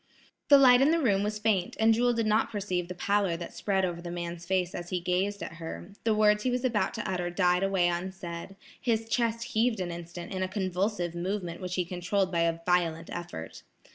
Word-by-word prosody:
The 285 - +9
light 255 -2 +7
in 275 - +5
the 330 - +3
room 205 -9 +2
was 210 +1 -1
faint, 210 -4 0
and 225 0 +5
Jewel 245 +2 +3
did 230 -1 0
not 215 +1 +2
perceive 185 -4 -2
the 180 - -6
pallor 195 -1 +1
that 170 0 -7
spread 195 -2 0
over 170 -1 -4
the 175 - -6
man's 170 0 -5
face 185 -1 0
as 175 0 -6
he 180 - -1
gazed 185 +3 -1
at 170 - -7
her; 170 +3 -7
the 220 -2 +3
words 210 0 +4
he 255 - 0
was 250 +1 -1
about 220 -6 0
to - - -4
utter 180 -2 -1
died 180 0 +2
away 195 -2 +2
unsaid, 175 +1 -4 0.3
his 225 -2 0
chest 230 0 0
heaved 225 -1 +1
an 180 -2 -2
instant 170 +2 -7
in 190 - -3
a 185 - +1
convulsive 185 -1 -1
movement 175 0 -3
which 180 0 -3
he 180 - 0
controlled 185 +2 -1
by 170 - 0
a 165 0 +1
violent 170 -2 +1
effort. 170 - -7
185 Hz, 220 wpm, -29 LUFS, 175-210 Hz, 0.3 s, The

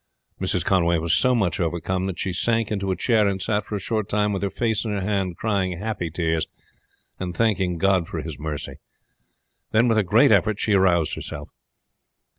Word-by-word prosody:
Mrs. - - 0
Conway 85 -3 +3
was 80 +1 0
so 130 -1 +3
much 95 -8 0
overcome 90 +2 -1
that 95 - -4
she 95 - -2
sank 115 +3 0
into 100 -2 -2
a 95 - +1
chair 110 +3 +2
and 95 -1 -1
sat 105 +3 0
for 105 - -5
a - - -2
short 110 +1 -2
time 105 0 +1
with 95 - -2
her 100 - 0
face 110 +2 -1
in 115 - -4
her 100 -1 -2
hand, 95 -3 -1
crying 95 -5 -1
happy 105 -3 -3
tears 80 -1 -1 0.7
and 90 -2 -4
thanking 95 -5 +1
God 95 -1 +2
for 80 - -5
his 80 -2 -6
mercy. 75 -2 -5 0.9
Then 115 +3 +3
with 115 -2 +3
a - - +3
great 85 - +4
effort 110 -1 +3
she 105 - +1
aroused 90 -5 +3
herself. 70 0 -6
95 Hz, 200 wpm, -23 LUFS, 85-105 Hz, 0.9 s, great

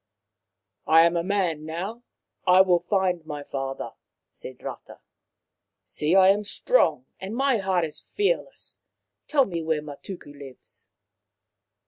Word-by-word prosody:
" - - -59
I 160 +1 +7
am 170 +1 +4
a 170 - +1
man 180 -5 0
now. 180 +9 -5 0.5
I 185 +1 +7
will 180 -2 +4
find 180 -1 0
my 150 -2 -6
father," 135 -1 -5 0.4
said - - -11
Rata. - - -8 0.5
" - - -59 0.3
See, 155 +4 -1
I 190 -1 +7
am 205 +2 +3
strong, 210 - +1
and 195 +4 -6
my 270 -2 +2
heart 185 -3 +1
is 155 - -9
fearless. 415 +4 -3 0.5
Tell 280 -3 +3
me 170 -5 -4
where 160 -2 -1
Matuku 150 +1 -9
lives." 140 -3 -14
175 Hz, 140 wpm, -25 LUFS, 155-200 Hz, 0.5 s, I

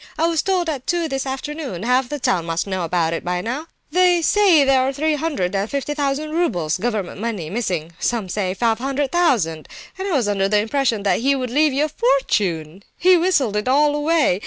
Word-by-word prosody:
I 320 - +2
was 330 -2 +1
told 370 -3 0
at 280 -5 -4
two 345 -2 0
this 270 -2 -3
afternoon. 270 - -5
Half 250 +1 +1
the 295 - -3
town 180 - 0
must 165 +1 -1
know 190 -3 -2
it 165 -2 0
by 180 0 -1
now. 255 - -4 0.2
They 355 0 +3
say 375 -6 +5
there 270 -1 +4
are 260 +1 +1
three 305 +3 0
hundred 290 - -2
and 200 +2 -1
fifty 280 +1 -2
thousand 290 +1 -2
roubles, 185 - 0
government 210 -3 -3
money, 205 -9 -4
missing; 180 -8 -2
some 230 -5 -1
say 185 0 -2
five 225 +1 +1
hundred 275 +1 -2
thousand. 225 - +1 0.3
And 385 - -3
I - - -2
was 255 -8 +1
under 195 -1 0
the 210 - +3
impression 225 0 0
that 200 - +2
he 275 +4 +2
would 255 -3 -3
leave 300 +3 +3
you 280 +3 +1
a - - -2
fortune! 200 - 0 0.2
He's 365 0 +5
whistled 290 - +1
it 210 +3 -1
all 290 +3 +3
away. 295 - +2
260 Hz, 210 wpm, -20 LUFS, 195-300 Hz, 0.3 s, say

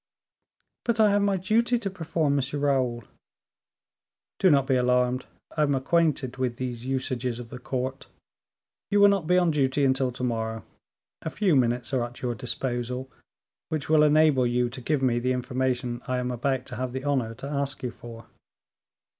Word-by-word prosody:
"But 235 -2 0
I 215 -2 +6
have 205 0 +3
my 200 -1 +2
duty 230 +6 +2
to 215 -4 -3
perform, 160 -5 0
M. 140 +2 -2
Raoul." 130 -4 +1 1.4
"Do 190 - +5
not 140 -4 +4
be 135 -1 +2
alarmed, 125 0 +1 0.3
I 155 - +1
am 145 -2 +3
acquainted 140 -2 +1
with 125 -2 -1
these 125 -1 -5
usages 130 -2 -2
of 120 -2 -8
the 125 - -7
court; 130 +1 -4 0.8
you 205 - +3
will 200 0 +8
not 195 -6 0
be 180 +1 +4
on 175 -2 +3
duty 140 -1 +1
until 130 -1 +2
to 125 - -6
morrow; 115 -3 -2 0.6
a - - -3
few 185 -2 +1
minutes 120 0 +1
are 125 -2 +2
at 120 +1 -8
your 120 -1 0
disposal, 125 +2 -3 0.6
which 155 -2 -3
will 155 -1 +5
enable 150 -4 +4
you 120 0 0
to 130 - -7
give 140 +2 0
me 120 -2 +2
the 125 +2 0
information 125 -1 -2
I 130 - 0
am 125 0 -2
about 130 +1 -1
to 125 - -8
have 125 -1 -3
the 130 0 -4
honor 130 -6 0
to 130 - -9
ask 140 -1 -3
you 125 - -2
for." 115 -1 -11
130 Hz, 180 wpm, -26 LUFS, 125-150 Hz, 1.4 s, will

